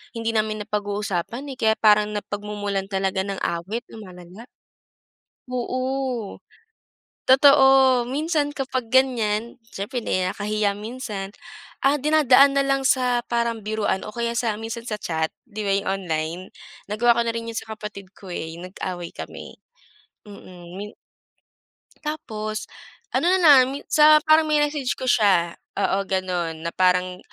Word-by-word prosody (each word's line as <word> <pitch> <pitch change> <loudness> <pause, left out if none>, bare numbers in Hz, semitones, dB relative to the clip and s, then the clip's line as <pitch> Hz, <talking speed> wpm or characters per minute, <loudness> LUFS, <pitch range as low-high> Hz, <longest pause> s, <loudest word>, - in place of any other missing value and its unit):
Hindi 230 0 -1
namin 215 -1 -1
napag-uusapan 210 +5 -3
eh, 260 - -9
kaya 220 0 +3
parang 210 -1 +3
napagmumulan 205 -1 -4
talaga 190 -1 -1
ng 195 -1 -4
awit, 190 +8 -3
lumalala. 185 +1 -12 1.0
Oo. 255 -2 -3 0.9
Totoo, 265 -2 +6
minsan 295 +1 0
kapag 260 -4 -3
ganiyan, 235 -4 +1
siyempre 225 +3 -5
nahi 185 -3 0
nakakahiya 210 +1 -1
minsan, 210 -3 -6 0.5
ah, 275 +2 +5
dinadaan 280 -2 +5
nalang 275 0 +1
sa 250 -2 +2
parang 235 -2 -1
biruan 210 -2 -1
o 215 - -6
kaya 235 +1 -3
sa 230 -3 0
minsan 225 +1 -6
sa 215 -1 -3
chat, 160 -3 -2 0.2
di 215 -3 -6
ba, 200 - -1
yung 200 - -3 0.2
online? 160 0 -3 0.5
Nagawa 235 +3 +3
ko 235 - +1
na 230 - -1
rin 230 0 -5
'yon 230 - -6
sa 220 0 -7
kapatid 205 -3 -9
ko 195 - -14
eh, 160 -1 -5
yung 180 - -8
nag-away 180 -2 -6
kami. - - -9 0.7
Mm, 180 -3 -12
min 210 +1 -6 1.1
Tapos, 215 -8 -4 0.5
ano 345 - +2
nalang 285 -7 +5
sa 305 0 +6
parang 310 0 +5
minessage 295 -3 +1
ko 260 - -4
siya, 190 -8 +3 0.2
oo, 195 - +1
gano'n, 175 -4 -2
na 170 - -2
parang 180 0 +2
220 Hz, 135 wpm, -23 LUFS, 195-255 Hz, 1.1 s, Totoo